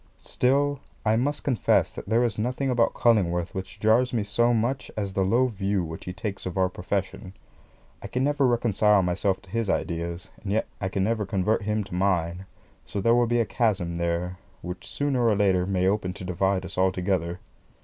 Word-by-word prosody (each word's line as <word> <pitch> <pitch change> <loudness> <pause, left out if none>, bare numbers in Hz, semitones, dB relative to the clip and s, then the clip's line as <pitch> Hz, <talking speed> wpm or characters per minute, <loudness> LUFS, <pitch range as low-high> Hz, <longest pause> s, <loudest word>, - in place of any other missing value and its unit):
Still 140 +2 +1 0.3
I 110 0 +3
must 145 +5 -1
confess 130 -5 +2
that - - -8
there 115 +2 +3
is 110 -4 -1
nothing 130 +4 -1
about 120 -2 +2
Cullingworth 90 -6 +2
which 95 -1 -6
jars 120 +4 +3
me 115 -3 +1
so 120 +4 +2
much 120 +3 0
as 100 -2 -2
the 95 - +1
low 115 +7 +3
view 100 -5 -1
which 80 0 -7
he 90 - -4
takes 100 0 -5
of 90 - -5
our 95 -1 +3
profession. 95 0 -4 0.7
I - - -6
can 125 - -1
never 145 -1 +2
reconcile 105 -4 +3
myself 95 +2 0
to 90 - -17
his 115 -2 -1
ideas, 85 0 -2
and 100 - -4
yet 110 - +1 0.2
I 95 - -1
can 95 0 -1
never 110 -1 0
convert 100 +2 +1
him 105 +1 -1
to 95 - -11
mine; 90 -1 0 0.4
so 100 - -4
there 115 +4 +3
will 120 0 +3
be 120 0 +2
a - - +1
chasm 95 -8 0
there 85 +1 -2 0.2
which 90 0 -7
sooner 140 -4 0
or 110 - +4
later 95 -3 +2
may 95 -1 +1
open 95 -2 0
to 95 - -9
divide 95 +1 0
us 95 0 -6
altogether. 90 -2 0
100 Hz, 200 wpm, -26 LUFS, 90-115 Hz, 0.7 s, or